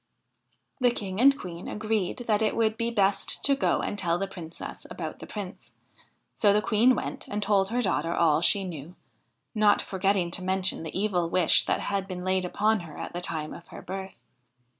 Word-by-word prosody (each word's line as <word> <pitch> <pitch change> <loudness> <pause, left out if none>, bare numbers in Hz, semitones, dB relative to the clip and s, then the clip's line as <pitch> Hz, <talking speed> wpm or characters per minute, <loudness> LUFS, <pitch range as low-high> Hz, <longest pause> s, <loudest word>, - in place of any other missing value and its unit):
The 250 -1 +4
King 200 -3 -3
and 275 +2 +6
Queen 175 -6 -8
agreed 215 -3 -1
that 215 -1 +2
it 215 - +1
would 220 -1 +2
be 230 +1 -1
best 200 -3 +1
to 280 - +4
go 275 - +1
and 205 - -2
tell 170 -2 +1
the 195 - -1
Princess 175 -4 -9
about - - -6
the - - -9
Prince; 200 -2 -8 0.6
so 205 - +3
the 205 - +4
Queen 235 +4 +4
went - - -5
and 205 0 -3
told 195 -1 +2
her 245 +2 0
daughter 165 -4 0
all 160 -2 +3
she 195 +3 +3
knew, 170 -1 -7 0.6
not 210 -2 +4
forgetting 190 -2 0
to 185 - -2
mention 190 -1 0
the 160 +3 -4
evil 180 -5 0
wish 175 -2 +3
that - - +1
had 195 -1 -2
been 180 -1 -6
laid 185 0 +1
upon 215 +4 +1
her 165 -4 -10
at - - -6
the 175 - -4
time 155 -3 -3
of 170 - -11
her - - -10
birth. 190 +1 -6
195 Hz, 200 wpm, -27 LUFS, 175-215 Hz, 0.6 s, and